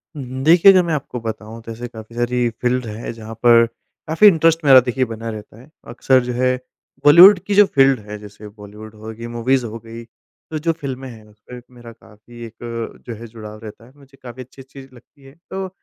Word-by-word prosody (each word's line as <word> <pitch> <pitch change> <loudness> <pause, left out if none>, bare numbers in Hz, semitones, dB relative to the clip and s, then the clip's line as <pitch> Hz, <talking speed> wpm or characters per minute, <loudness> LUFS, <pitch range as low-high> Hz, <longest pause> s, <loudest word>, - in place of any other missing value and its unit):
हुँ, 140 - -6
हुँ। 130 - -5
देखिए 170 +5 +7
अगर 185 -1 +4
मैं 170 -2 -2
आपको 125 -4 -5
बताऊँ 110 0 -7
तो 115 - -9
ऐसे 120 +2 -7
काफ़ी 115 0 -13
सारी 120 0 -1
फ़ील्ड 125 0 -1
है 110 +2 -7
जहाँ 115 0 -10
पर 115 -1 +6 0.4
काफ़ी 185 +7 +5
इंटरेस्ट 165 -2 +3
मेरा 135 -2 +8
देखिए 125 +1 -2
बना 115 0 -7
रहता 110 +1 -10
है। 135 - -19 0.2
अक्सर 130 +2 +1
जो 125 - -4
है 125 +1 0 0.5
बॉलीवुड 180 +6 +8
की 200 - -1
जो 205 - +7
फ़ील्ड 135 -6 +2
है 105 - -6
जैसे 105 0 -13
बॉलीवुड 105 +1 -13
हो 110 +1 -9
गई, 115 +1 -9
मूवीज़ 120 +2 -1
हो 115 0 -7
गई, 115 +1 -11
तो 155 +6 -12
जो 165 +2 0
फ़िल्में 135 -4 -7
हैं 110 -2 -14
उसमें 105 +4 -14 0.2
मेरा 120 -1 -12
काफ़ी 115 +2 -16
एक 115 0 -8
जो 120 - -5
है 115 +2 -11
जुड़ाव 110 -1 -11
रहता 110 +1 -11
है, 125 - -19
मुझे 140 -1 -21
काफ़ी 125 +1 -9
अच्छी-अच्छी 135 +2 -15
लगती 135 +3 -21
है। 135 - -16 0.2
तो 190 0 -5
120 Hz, 210 wpm, -19 LUFS, 115-135 Hz, 0.5 s, मेरा